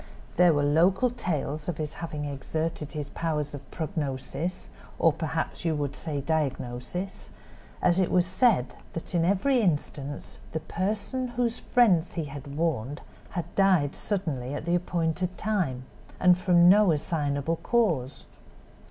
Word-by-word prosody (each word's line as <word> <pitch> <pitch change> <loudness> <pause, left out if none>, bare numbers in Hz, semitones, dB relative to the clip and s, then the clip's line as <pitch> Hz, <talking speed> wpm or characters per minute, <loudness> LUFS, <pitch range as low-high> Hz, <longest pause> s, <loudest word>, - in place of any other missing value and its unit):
There 175 0 +6
were 145 - +2
local 180 - +3
tales 155 - -2
of 165 - -3
his 155 -1 -3
having 150 -3 -5
exerted 150 +2 -3
his 150 -2 -5
powers 150 -3 -2
of 140 -2 -9
prognosis, 155 +2 -4 0.3
or - - +4
perhaps - - -3
you 165 -2 +1
would 145 -2 -2
say 150 -4 -3
diagnosis; 145 +3 -3 0.5
and 175 +1 +4
it 185 - +2
was 180 -1 +3
said 185 - +2 0.2
that 165 - -5
in 170 -2 +3
every 205 +9 +3
instance 145 -5 -2
the 160 - 0
person 210 +10 -2
whose 240 -1 0
friends 190 -9 +3
he 165 -3 -2
had 140 0 -8
warned 145 -4 -1 0.3
had 175 0 -4
died 185 -8 +3
suddenly 145 -10 -2
at 145 - -5
the 170 - +1
appointed 175 0 -1
time, 175 -13 -1 0.3
and 180 -1 +6
from 175 -1 +5
no 200 0 +7
assignable 150 0 -1
cause. 165 - 0
165 Hz, 145 wpm, -27 LUFS, 145-185 Hz, 0.5 s, no